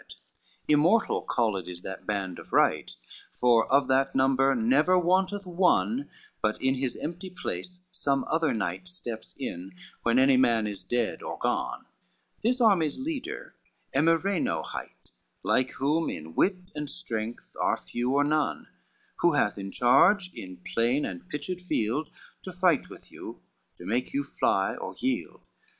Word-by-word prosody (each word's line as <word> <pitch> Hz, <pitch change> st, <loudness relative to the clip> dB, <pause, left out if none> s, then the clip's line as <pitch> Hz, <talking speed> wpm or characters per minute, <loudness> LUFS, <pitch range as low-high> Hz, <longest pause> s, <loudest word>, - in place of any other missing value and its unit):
CXXIII -, -, -14 dB, 0.5 s
"Immortal 160 Hz, +9 st, +4 dB
called 110 Hz, -6 st, -1 dB
is 90 Hz, 0 st, -8 dB
that 95 Hz, -, -7 dB
band 95 Hz, -4 st, -2 dB
of -, -, -13 dB
right, -, -, +3 dB, 0.4 s
For 120 Hz, -2 st, +3 dB
of 140 Hz, +1 st, +4 dB
that 135 Hz, +1 st, +2 dB
number 135 Hz, 0 st, +3 dB
never 135 Hz, +10 st, +3 dB
wanteth 185 Hz, +3 st, +1 dB
one, 185 Hz, +9 st, +2 dB, 0.3 s
But 110 Hz, 0 st, 0 dB
in 130 Hz, 0 st, +2 dB
his 130 Hz, -1 st, -2 dB
empty 175 Hz, +4 st, -5 dB
place 180 Hz, 0 st, -6 dB
some 140 Hz, -5 st, 0 dB
other 160 Hz, -2 st, +1 dB
knight 95 Hz, -5 st, -3 dB
Steps 110 Hz, +5 st, -6 dB
in, 90 Hz, +2 st, -6 dB, 0.3 s
when 115 Hz, +1 st, +2 dB
any 130 Hz, 0 st, +5 dB
man 115 Hz, -4 st, +3 dB
is 100 Hz, -3 st, -5 dB
dead 120 Hz, +3 st, -1 dB
or -, -, -5 dB
gone: -, -, -2 dB, 0.6 s
This 250 Hz, +4 st, +1 dB
army's 190 Hz, -, +3 dB
leader 275 Hz, +1 st, -5 dB, 0.4 s
Emireno 165 Hz, +6 st, +2 dB
hight, -, -, -9 dB, 0.3 s
Like 130 Hz, 0 st, +2 dB
whom 150 Hz, +5 st, +1 dB
in 80 Hz, +1 st, -7 dB
wit 185 Hz, -, 0 dB
and 150 Hz, -1 st, -4 dB
strength 115 Hz, -8 st, -5 dB
are -, -, +2 dB
few 125 Hz, +3 st, -2 dB
or 145 Hz, -, +4 dB
none, 150 Hz, +1 st, 0 dB, 0.5 s
Who 170 Hz, -2 st, +4 dB
hath 105 Hz, -8 st, +1 dB
in 100 Hz, 0 st, -5 dB
charge 180 Hz, -, +4 dB
in 90 Hz, -1 st, -10 dB
plain 120 Hz, +5 st, +2 dB
and 90 Hz, -1 st, -7 dB
pitched 175 Hz, +5 st, -4 dB
field, 150 Hz, -3 st, -1 dB, 0.3 s
To 185 Hz, -, -7 dB
fight 180 Hz, -4 st, +2 dB
with -, -, -13 dB
you, -, -, -10 dB, 0.3 s
to -, -, -12 dB
make 120 Hz, -, -1 dB
you 285 Hz, -, +1 dB
fly -, -, +1 dB
or -, -, -6 dB
yield. 260 Hz, 0 st, -3 dB
135 Hz, 155 wpm, -28 LUFS, 115-180 Hz, 0.6 s, any